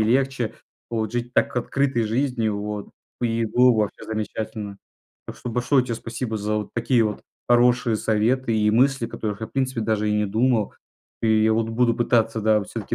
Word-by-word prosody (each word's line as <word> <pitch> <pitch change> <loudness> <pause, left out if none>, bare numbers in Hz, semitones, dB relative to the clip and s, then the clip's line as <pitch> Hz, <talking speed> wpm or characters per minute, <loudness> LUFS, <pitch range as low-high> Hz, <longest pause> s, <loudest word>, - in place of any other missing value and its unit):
и - - +3
легче, 125 -1 +1 0.4
вот 110 -1 -2
жить 120 0 -3
так - - +1
открытой 130 0 0
жизнью 115 -2 0
вот. 105 0 -5 0.3
И 115 -1 0
было 125 +3 +5
вообще 105 -2 -1
замечательно. 110 -1 -4 0.5
Так - - -8
что 125 - -6
большое 125 +2 +2
тебе 120 - -3
спасибо 115 0 -4
за 105 +1 -2
вот 105 - -5
такие 120 0 +2
вот 105 -1 -3 0.3
хорошие 120 -1 +4
советы 115 +3 +1
и 105 0 +3
мысли, 130 +2 +3
о - - -11
которых 105 -3 -4
я, 110 - -3
в - - -23
принципе, 130 -3 -1
даже 110 -1 0
и - - +1
не 105 0 +1
думал. 110 +1 +1 0.5
И 110 -1 +3
я 110 - +4
вот 110 0 0
буду 115 +1 +2
пытаться, 115 -1 +1
да, 110 -1 +3
всё-таки - - -5
115 Hz, 190 wpm, -23 LUFS, 110-125 Hz, 0.5 s, было